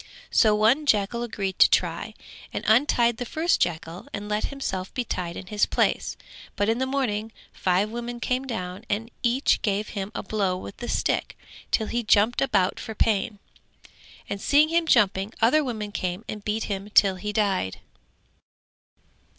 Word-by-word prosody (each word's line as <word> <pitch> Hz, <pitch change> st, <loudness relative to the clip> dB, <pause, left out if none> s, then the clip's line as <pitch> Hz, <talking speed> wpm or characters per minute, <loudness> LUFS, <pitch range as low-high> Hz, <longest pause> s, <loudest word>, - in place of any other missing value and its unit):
So 215 Hz, -2 st, +5 dB
one 235 Hz, +8 st, +3 dB
jackal 215 Hz, 0 st, +2 dB
agreed 200 Hz, -5 st, -3 dB
to -, -, +8 dB
try -, -, 0 dB, 0.4 s
and -, -, -4 dB
untied 235 Hz, 0 st, +3 dB
the 245 Hz, -, -3 dB
first 320 Hz, +8 st, 0 dB
jackal 170 Hz, 0 st, -2 dB
and 205 Hz, -, -5 dB
let 210 Hz, 0 st, 0 dB
himself 190 Hz, -10 st, -4 dB
be 250 Hz, -, 0 dB
tied 175 Hz, -6 st, -4 dB
in 190 Hz, -, -7 dB
his 210 Hz, +2 st, +1 dB
place, -, -, 0 dB, 0.4 s
but 205 Hz, -, 0 dB
in 225 Hz, +2 st, +1 dB
the 260 Hz, -, 0 dB
morning 225 Hz, -5 st, -1 dB, 0.2 s
five 190 Hz, +3 st, +1 dB
women 240 Hz, +1 st, -5 dB
came 255 Hz, +2 st, -1 dB
down 185 Hz, -4 st, -5 dB
and 225 Hz, +3 st, -2 dB
each 245 Hz, +3 st, +2 dB
gave 205 Hz, 0 st, -1 dB
him 200 Hz, -1 st, -5 dB
a -, -, -3 dB
blow 195 Hz, -4 st, -1 dB
with 190 Hz, -, -9 dB
the 240 Hz, -, -6 dB
stick -, -, -1 dB, 0.3 s
till 220 Hz, -, +1 dB
he 240 Hz, +2 st, -1 dB
jumped 215 Hz, +1 st, +3 dB
about 190 Hz, -9 st, +1 dB
for 220 Hz, -, -7 dB
pain, 210 Hz, 0 st, +1 dB, 0.9 s
and 200 Hz, -, -4 dB
seeing 295 Hz, +2 st, +4 dB
him 335 Hz, 0 st, +1 dB
jumping 205 Hz, -4 st, +3 dB
other 275 Hz, +7 st, +4 dB
women 215 Hz, -5 st, -4 dB
came 185 Hz, +2 st, -3 dB
and 210 Hz, -1 st, -6 dB
beat 215 Hz, +2 st, -1 dB
him 200 Hz, 0 st, -4 dB
till 195 Hz, -2 st, +5 dB
he 210 Hz, +3 st, -4 dB
died. 200 Hz, -, 0 dB
215 Hz, 170 wpm, -25 LUFS, 195-240 Hz, 0.9 s, to